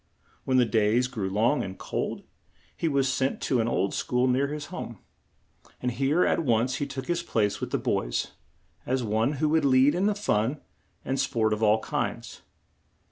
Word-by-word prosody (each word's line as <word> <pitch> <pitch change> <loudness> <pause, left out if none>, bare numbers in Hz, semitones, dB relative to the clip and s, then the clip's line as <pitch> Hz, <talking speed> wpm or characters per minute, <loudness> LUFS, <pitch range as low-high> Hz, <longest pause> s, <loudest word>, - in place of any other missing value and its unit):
When 130 -1 +2
the 125 - +5
days 110 +3 +2
grew 105 -7 -3
long 115 +9 +2
and 95 -1 -7
cold, - - -4 0.5
he 165 - -1
was 140 -3 +2
sent 135 0 0
to 125 -3 +1
an 115 - -1
old 100 -4 0
school 125 0 0
near 130 +2 +2
his 150 0 -5
home, 120 - -6 0.8
and 125 - -1
here 135 +8 +2
he - - +2
at 165 - 0
once 125 0 +1
took 135 -2 -4
his 175 0 0
place 105 -11 0
with - - -3
the - - 0
boys, - - -1 0.5
as 130 0 -1
one 110 +5 +1
who 150 +2 0
would 160 0 +2
lead 135 +1 +5
in 195 +4 +2
fun 135 - 0 0.5
and 135 0 -1
sport 115 -5 +1
of 105 - -3
all 110 0 +4
kinds. - - -4
130 Hz, 185 wpm, -27 LUFS, 110-140 Hz, 0.8 s, the